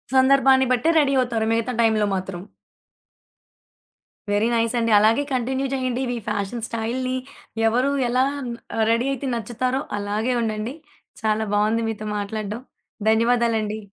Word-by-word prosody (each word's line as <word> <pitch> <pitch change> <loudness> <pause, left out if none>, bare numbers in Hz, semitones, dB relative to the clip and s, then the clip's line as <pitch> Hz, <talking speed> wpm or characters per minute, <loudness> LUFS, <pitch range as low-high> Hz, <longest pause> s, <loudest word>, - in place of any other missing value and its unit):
సందర్భాన్ని 265 0 +5
బట్టే 255 +6 +2
రడీ 275 -2 +2
అవుతారు 235 -3 0
మిగతా 230 +2 0
టైమ్‌లో 220 -2 +3
మాత్రం. 185 -1 -5 1.9
వెరీ 205 +2 +2
నైస్ 230 +1 +1
అండి. 230 -1 +1
అలాగే 225 +7 +3
కంటిన్యూ 260 +2 -1
జేయండి 255 -1 -1
ఇవి 245 -1 -2
ఫ్యాషన్ 210 +3 -3
స్టైల్‌ని 245 +3 -2 0.5
ఎవరు 250 +5 +2 0.2
ఎలా 250 +2 +2 0.7
రడీ 230 +3 +2
అయితే 275 +1 -4
నచ్చుతారో 245 +4 -2 0.2
అలాగే 210 +5 -1
ఉండండి. 220 +2 -2 0.5
చాలా 220 0 +1
బావుంది 215 +2 +2
మీతో 215 -1 -5
మాట్లాడ్డం 210 +2 -4 0.5
ధన్యవాదాలండి. 225 -2 +1
230 Hz, 120 wpm, -23 LUFS, 215-255 Hz, 1.9 s, సందర్భాన్ని